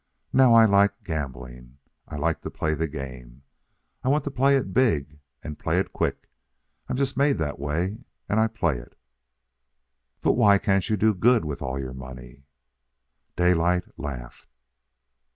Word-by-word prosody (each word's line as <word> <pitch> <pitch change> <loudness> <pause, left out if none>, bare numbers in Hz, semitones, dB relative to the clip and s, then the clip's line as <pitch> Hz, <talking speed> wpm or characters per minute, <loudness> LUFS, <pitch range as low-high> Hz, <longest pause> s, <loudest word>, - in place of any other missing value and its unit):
Now 130 -3 +6
I 115 -1 +8
like 100 -1 +3
gambling. 65 -5 -6 0.3
I - - -8
like 80 +3 -1
to - - -5
play 80 - -2
the 80 +1 -1
game. 65 -3 -9 0.6
I 130 - 0
want 145 +1 +2
to 145 - -4
play 135 +2 +3
it 125 -9 -1
big 75 - +1 0.2
and 75 - -7
play - - 0
it - - -1
quick. - - -2 0.6
I'm - - -2
just 135 0 -1
made 140 +1 +3
that 75 -4 -3
way. 85 +9 -2 0.3
And 110 - +1
I 110 - +4
play 95 - -1
it." - - -15 1.2
"But - - +3
why 100 -1 +5
can't 100 -1 0
you 110 - +1
do 110 +2 +3
good 115 +2 +3
with 75 -2 -5
all 65 -1 -3
your 65 -1 -5
money?" 65 0 -11 0.9
Daylight 90 0 +2
laughed. 65 -4 -8
80 Hz, 160 wpm, -25 LUFS, 70-110 Hz, 1.2 s, I